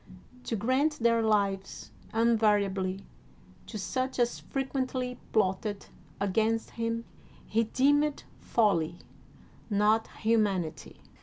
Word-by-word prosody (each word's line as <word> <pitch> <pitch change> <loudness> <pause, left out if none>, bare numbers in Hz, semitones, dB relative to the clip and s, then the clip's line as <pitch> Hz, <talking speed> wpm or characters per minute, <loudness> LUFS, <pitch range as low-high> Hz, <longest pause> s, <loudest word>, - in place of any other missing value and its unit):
To 230 - -1
grant 260 +8 +2
their 230 -4 +2
lives 200 -3 0 0.2
invariably 205 -4 +2 0.6
to 220 - -6
such 255 +6 -2
as 240 -1 +1
frequently 260 -2 -3
plotted 205 0 0 0.3
against 220 +3 0
him 230 0 -2 0.4
he 225 +1 +1
deemed 290 +5 +2 0.2
folly, 175 -8 +1 0.7
not 215 +2 +3 0.2
humanity. 205 -7 0
225 Hz, 90 wpm, -29 LUFS, 200-245 Hz, 0.7 s, not